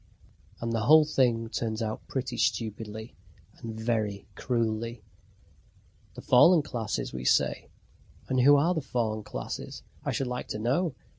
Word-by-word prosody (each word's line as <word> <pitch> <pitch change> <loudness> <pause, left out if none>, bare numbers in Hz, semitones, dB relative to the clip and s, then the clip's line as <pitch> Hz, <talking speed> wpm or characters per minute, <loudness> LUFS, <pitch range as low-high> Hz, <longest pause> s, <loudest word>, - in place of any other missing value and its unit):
And 115 0 -3
the 115 0 -1
whole 155 0 +8
thing 120 -6 +1
turns 110 -1 -3
out 110 -1 -4
pretty 130 -2 -3
stupidly 110 -1 -2 0.4
and 110 -1 -7
very 110 -3 -1
cruelly. 115 -1 -2 1.1
The - - -9
fallen 160 +6 +6
classes, 115 -6 -3
we 65 0 -5
say. - - +1 0.6
And 130 - +1
who 140 +3 +7
are 160 +6 +3
the 160 - -2
fallen 115 -5 -2
classes, 60 -11 -6 0.2
I - - -1
should 135 - -1
like 125 0 -4
to - - -4
know? 130 +8 0
115 Hz, 145 wpm, -28 LUFS, 110-130 Hz, 1.1 s, whole